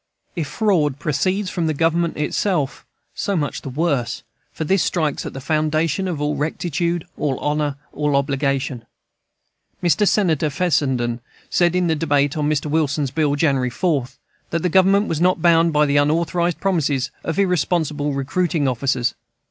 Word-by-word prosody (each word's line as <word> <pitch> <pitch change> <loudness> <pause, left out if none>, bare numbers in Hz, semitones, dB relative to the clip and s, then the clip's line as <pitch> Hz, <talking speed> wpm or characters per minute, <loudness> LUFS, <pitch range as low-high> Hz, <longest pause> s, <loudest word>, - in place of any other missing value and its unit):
If 165 -5 -2
fraud 160 - +1
proceeds 185 +7 -1
from 170 -2 -1
Government 165 +2 0
itself, 150 -1 -1 0.3
so 200 - -2
much 145 -3 -2
the - - -6
worse, 140 -3 -1 0.3
for - - -4
this 190 +4 +2
strikes 155 -5 -1
at - - -7
the 135 - -6
foundation 155 +5 0
of 170 -5 -3
all 150 0 -1
rectitude, 170 +3 -2
all 140 -4 0
honor, 150 -1 -1 0.2
all 150 -1 0
obligation. 140 -3 -1 1.0
Mr. 175 +4 +3
Senator 160 -8 +2
Fessenden 135 -7 0 0.3
said, 175 0 +2
in 180 0 +2
the 165 - +2
debate 145 -2 +1
on 150 -1 0
Mr. 150 -1 0
Wilson's 150 -2 0
bill, 145 0 +1
January 135 -4 +1
4, 140 0 0 0.4
that 165 -1 -2
the 180 - +2
Government 195 +3 +4
was 160 0 -2
not 180 0 +3
bound 165 0 +4
by 150 0 +3
the 145 0 +2
unauthorized 170 +3 +1
promises 145 -9 0
of 165 - -3
irresponsible 160 -5 +1
recruiting 145 +3 0
officers. 125 -1 0
155 Hz, 155 wpm, -21 LUFS, 140-170 Hz, 1.0 s, Government